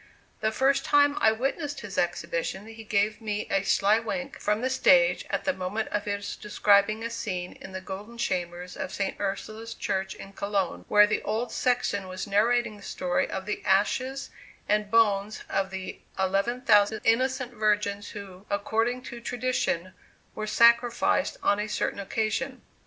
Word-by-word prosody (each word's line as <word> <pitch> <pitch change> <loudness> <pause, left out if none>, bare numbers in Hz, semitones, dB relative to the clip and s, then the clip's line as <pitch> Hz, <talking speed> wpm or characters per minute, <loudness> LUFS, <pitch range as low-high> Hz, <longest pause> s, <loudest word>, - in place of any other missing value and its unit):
The 220 0 +1
first 275 +3 +2
time 285 0 +4
I 220 - +6
witnessed 275 +5 -2
his 205 -4 -7
exhibition 175 +2 -2
he 225 0 -10
gave 215 0 0
me 210 -1 -2
a 195 - +3
sly 200 +2 +3
wink 270 +4 -4
from 210 +1 0
the 260 - 0
stage - - +4
at - - -1
the 280 - +1
moment 200 +3 -3
of 205 - -2
his 200 0 -3
describing 210 +1 +2
a 230 - -2
scene 185 -6 -4
in 190 - -9
the 190 0 -6
golden 200 +5 -8
chamber 175 -5 -2
of 185 - -5
St. 195 -1 -3
Ursula's 215 +3 -4
church 190 0 -2
in 195 - -11
Cologne, 200 -3 -2
where 210 0 +7
the 210 - -1
old 225 +3 -2
sexton 235 -6 0
was 185 0 -5
narrating 215 +2 +2
the - - -15
story 180 -2 -1
of 190 0 -4
the 210 - -3
ashes 255 +7 +1 0.4
and 210 0 +1
bones 210 -2 +2
of 195 0 -1
the 190 -1 -6 0.2
eleven 195 +6 0
thousand 210 -2 +4
innocent 255 +2 +1
virgins 210 -2 0
who, 200 -1 -10
according 225 +5 0
to 235 0 -8
tradition, 235 -8 -1 0.4
were 215 0 -4
sacrificed 235 - +3
on 205 - +3
a 210 - -2
certain 210 - -1
occasion. 220 +6 -2
210 Hz, 165 wpm, -27 LUFS, 195-235 Hz, 0.4 s, where